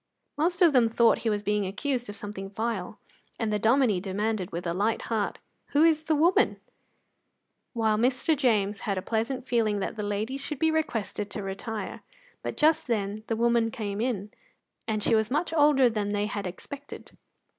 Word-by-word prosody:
Most 350 +4 +2
of 330 -4 +6
them 245 -3 +5
thought 230 0 +4
he 230 - -1
was 210 -1 -1
being 210 -1 0
accused 245 +4 -2
of 205 - -6
something 200 -1 -6
vile, 215 -1 -3 0.4
and 220 -2 -1
the 210 - +1
Dominie 225 -3 +3
demanded, 205 0 -2
with 170 +2 -5
a 170 - -1
light 210 +5 0
heart, 210 -2 -1 0.4
"Who 290 +2 +5
is 315 -1 +3
the 315 - +2
woman?" 335 +5 +3 1.1
while 220 -3 +1
Mr. 255 +6 +2
James 210 -7 +1
had 200 -2 -2
a 185 - -3
pleasant 235 +4 -2
feeling 220 -4 +1
that 200 - -3
the - - -2
ladies 210 +6 -2
should 300 +1 -4
be 320 +3 +2
requested 225 -9 -2
to 205 - -5
retire. 200 +3 -5 0.4
But - - -5
just 310 -1 +3
then 210 -2 -2
the 225 - 0
woman 235 0 +2
came 215 -4 -4
in, 210 -5 -2 0.6
and 215 -1 -1
she - - +2
was 220 -1 +2
much 310 +5 -1
older 290 -4 +5
than 210 -3 -1
they 205 0 0
had 205 -2 -3
expected. 280 +10 -9
225 Hz, 185 wpm, -27 LUFS, 205-260 Hz, 1.1 s, of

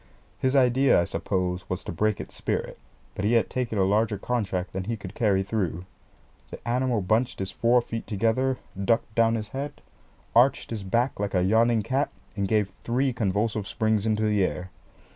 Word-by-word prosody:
His 130 +1 +1
idea, 130 -1 +5
I - - +3
suppose, 90 +1 -2
was 90 0 -3
to - - -5
break 105 +5 0
its - - -7
spirit, - - -3 0.3
but - - -4
he 105 +3 +2
had 115 - +2
taken 120 -4 -2
a 95 - +3
larger 105 +2 +2
contract 100 -5 -2
than 95 0 -3
he 115 +2 -2
could 100 -2 -9
carry 100 -4 +2
through. 95 -4 -2 0.6
The - - -10
animal 125 -2 +1
bunched 110 +6 +1
his 95 -1 -3
four 120 +1 +3
feet 115 -1 -5
together, 115 +5 +1 0.3
ducked 115 +1 +1
down 115 0 +3
his 110 -2 -4
head, 140 +2 -5 0.6
arched 130 +3 +4
his 110 -3 -3
back 115 +7 0
like 100 -1 -2
a 90 - +3
yawning 110 +3 +3
cat, 135 +5 0 0.3
and 100 -2 -1
gave 105 -1 +1
three 130 +2 +1
convulsive 105 -1 -1
springs 110 0 0
into 110 0 +1
the 105 -2 +2
air. 90 0 -3
110 Hz, 185 wpm, -26 LUFS, 95-120 Hz, 0.6 s, idea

